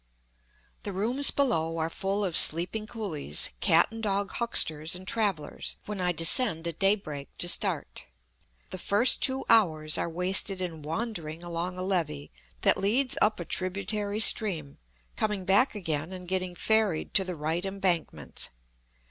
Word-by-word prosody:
The 205 - -6
rooms 240 +9 +2
below 165 - 0
are 160 0 -1
full 195 +4 -3
of 175 -4 -2
sleeping 180 +7 +5
coolies, 165 - -3
cat 165 - +3
and 225 0 -8
dog 200 -2 -2
hucksters 160 -8 +1
and 185 +1 -9
travellers, 200 -10 -2
when 205 -2 -5
I 180 0 +1
descend 165 +1 +3
at 170 - -6
day 195 +1 +4
break 150 -8 -10
to 175 - -3
start. - - +1 0.7
The 185 - -7
first 205 +8 +3
two 265 0 +1
hours 155 -9 +3
are - - -2
wasted 185 +3 +2
in 170 -4 -5
wandering 165 -1 -5
along 175 +1 -5
a 185 - -4
levee 165 - -3 0.3
that - - +4
leads 245 +7 0
up 215 -2 +2
a 175 - -6
tributary 200 +4 -2
stream, 180 -10 +3 0.4
coming 210 -3 -2
back 205 +7 +2
again 160 -4 -3
and 180 -1 -9
getting 185 -1 -3
ferried 215 -5 0
to 195 - +4
the 185 -1 -5
right 160 +3 -3
embankment. 195 -4 -3
185 Hz, 155 wpm, -27 LUFS, 165-210 Hz, 0.7 s, sleeping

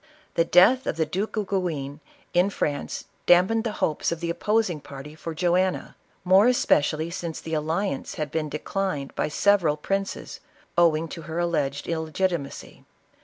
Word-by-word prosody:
The 165 - +2
death 205 +11 +5
of - - -1
the 160 - +2
Duke 195 +8 -3
of 210 - 0
Guienue, 160 -8 -2 0.3
in 180 +2 +4
France, 145 -7 -3 0.2
dampened 185 +6 +5
the 220 - -1
hopes 155 - 0
of 170 - -3
the 170 0 -2
opposing 210 -3 0
party 140 +2 -9
for 160 +1 -7
Joanna, 180 +2 0 0.3
more 190 +5 +6
especially 160 -9 +2
since 170 -2 -5
the 160 - -7
alliance 160 +1 -2
had 150 -2 -3
been 155 -1 -2
declined 150 -1 -3
by - - -1
several 170 -2 +3
princes, 195 +5 -3 0.4
owing 165 -2 +3
to 165 - -7
her 160 - -4
alleged 150 -5 -1
illegitimacy. 160 -1 -3
170 Hz, 155 wpm, -25 LUFS, 155-190 Hz, 0.4 s, more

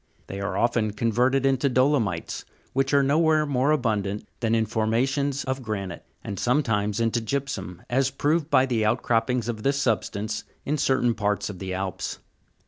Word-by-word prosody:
They 100 +1 -6
are 100 - -2
often 115 -3 +1
converted 125 +5 +2
into 135 +1 +2
dolomites, 125 - +1 0.3
which 135 0 +1
are 140 -1 +4
nowhere 155 +2 +3
more 140 -1 +1
abundant 105 -8 0
than 115 -1 +1
in 110 -1 +2
formations 130 +6 0
of 130 0 -3
granite 100 -7 -4 0.2
and 100 -3 -5
sometimes 110 -6 +1
into 115 0 +1
gypsum, 110 -8 -4
as 130 +2 +2
proved 145 +3 0
by 130 - +5
the 120 -4 0
out 110 +4 +1
croppings 120 0 +1
of 115 -3 -3
this 140 +4 +1
substance 110 -3 -1 0.2
in 150 +1 -1
certain 130 -3 +2
parts 105 -1 -1
of 95 - -11
the 95 -1 -4
Alps. 95 -2 -3
120 Hz, 165 wpm, -25 LUFS, 105-135 Hz, 0.3 s, by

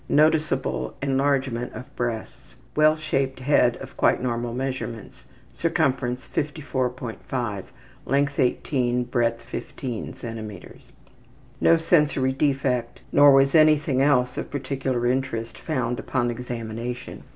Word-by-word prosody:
Noticeable 150 - +2
enlargement 135 -3 0
of 125 +5 -10
breasts. 120 -2 -4 0.2
Well 155 +1 +5
shaped 135 -4 -1
head 125 -3 +3
of - - -10
quite - - +3
normal 120 -1 -2
measurements; 130 -3 -5 0.3
circumference 135 -7 0
54.5, 125 - -3 0.4
length 140 0 +1
18, 125 -1 +1
breadth 120 -1 0
15 125 +1 -5
cm. 110 -6 -8 0.8
No 165 - +6
sensory 150 -5 +2
defect, 130 -4 0
nor 145 0 +7
was 135 0 +5
anything 155 -4 +4
else 125 -3 +2
of - - -5
particular 135 -3 -2
interest 120 -3 -1
found 130 -6 -2
upon 120 -2 -1
examination. 120 0 -5
130 Hz, 105 wpm, -24 LUFS, 120-140 Hz, 0.8 s, nor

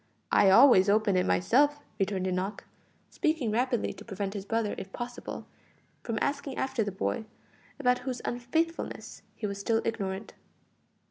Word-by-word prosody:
I 195 - +6
always 200 -2 +7
open 210 -1 +3
it 180 - +2
myself;" 290 +10 +3 0.2
returned 195 -1 0
Enoch, 185 +2 -2 0.5
speaking 310 -9 0
rapidly 245 +2 0
to - - -12
prevent 195 -2 -4
his 200 -2 -5
brother, 225 -2 0
if 195 - -8
possible, 245 +2 -6 0.6
from 230 -2 -3
asking 280 -1 -2
after 265 -4 0
the 205 - -3
boy, 220 +4 -2 0.5
about 250 -2 +3
whose 250 -1 -4
unfaithfulness 320 +8 -2
he - - -5
was 200 -1 -3
still 225 +3 +1
ignorant. 195 -2 -3
225 Hz, 145 wpm, -29 LUFS, 195-255 Hz, 0.6 s, always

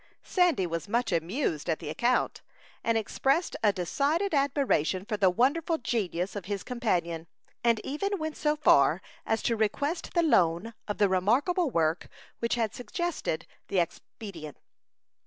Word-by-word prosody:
Sandy 355 - +2
was 170 +2 -4
much 235 +2 0
amused 170 - -1
at 160 - +1
the - - -7
account, 240 +10 +1 0.4
and 230 -1 +2
expressed 270 - 0
a 210 - +5
decided 285 - 0
admiration 275 - +1
for 215 - -2
the 200 -3 +4
wonderful 290 - +2
genius 195 - -2
of 200 -3 -5
his 200 0 -3
companion, 175 -9 -1 0.4
and 235 -2 +3
even 395 +9 -2
went 315 -2 -4
so 300 0 +1
far 170 - +4 0.2
as 225 - 0
to 230 - +1
request 285 - -1
the 340 - +4
loan 185 - +2
of 205 - -3
the 205 - +4
remarkable 250 - +2
work 165 -4 0 0.3
which 235 +1 0
had 225 -3 -1
suggested 265 - -3 0.2
the 195 - -2
expedient. 170 -2 -4
225 Hz, 150 wpm, -28 LUFS, 180-285 Hz, 0.4 s, a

